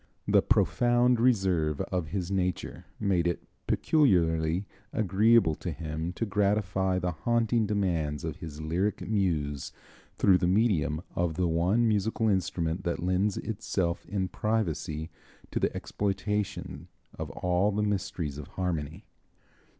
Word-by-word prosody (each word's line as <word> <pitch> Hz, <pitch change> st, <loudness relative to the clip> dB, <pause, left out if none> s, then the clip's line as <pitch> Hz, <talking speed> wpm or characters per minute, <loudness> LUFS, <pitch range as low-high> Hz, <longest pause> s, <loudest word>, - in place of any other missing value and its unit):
The -, -, +5 dB
profound 120 Hz, 0 st, +3 dB
reserve 95 Hz, -, +2 dB
of 90 Hz, -4 st, -2 dB
his 90 Hz, +2 st, -3 dB
nature 90 Hz, -1 st, -2 dB
made 95 Hz, -5 st, +1 dB
it 85 Hz, -, -2 dB, 0.2 s
peculiarly 85 Hz, -, +2 dB, 0.3 s
agreeable 110 Hz, -2 st, +4 dB
to 90 Hz, -, -5 dB
him 80 Hz, +1 st, -4 dB
to 115 Hz, -, -2 dB
gratify 100 Hz, -2 st, +1 dB
the 90 Hz, 0 st, -1 dB
haunting 115 Hz, +5 st, +1 dB
demands 85 Hz, -8 st, -1 dB
of -, -, -4 dB
his 75 Hz, -2 st, -8 dB
lyric 90 Hz, +7 st, -1 dB
muse 80 Hz, -9 st, -1 dB, 0.5 s
through 95 Hz, -2 st, +5 dB
the 90 Hz, -, +1 dB
medium 90 Hz, -6 st, +2 dB
of 85 Hz, -2 st, 0 dB
the 90 Hz, 0 st, +1 dB
one 90 Hz, +8 st, +2 dB
musical 110 Hz, +1 st, +1 dB
instrument 90 Hz, -3 st, -1 dB
that 85 Hz, 0 st, -2 dB
lends 95 Hz, +3 st, +1 dB
itself 95 Hz, -5 st, -2 dB
in 95 Hz, -2 st, -1 dB
privacy 85 Hz, -7 st, -2 dB, 0.4 s
to -, -, -1 dB
the -, -, +1 dB
exploitation 105 Hz, 0 st, -3 dB, 0.3 s
of -, -, -4 dB
all 90 Hz, +3 st, +1 dB
the 105 Hz, +1 st, 0 dB
mysteries 90 Hz, -8 st, -2 dB
of 75 Hz, -, -8 dB
harmony. 80 Hz, -5 st, -3 dB
90 Hz, 130 wpm, -29 LUFS, 80-105 Hz, 0.5 s, The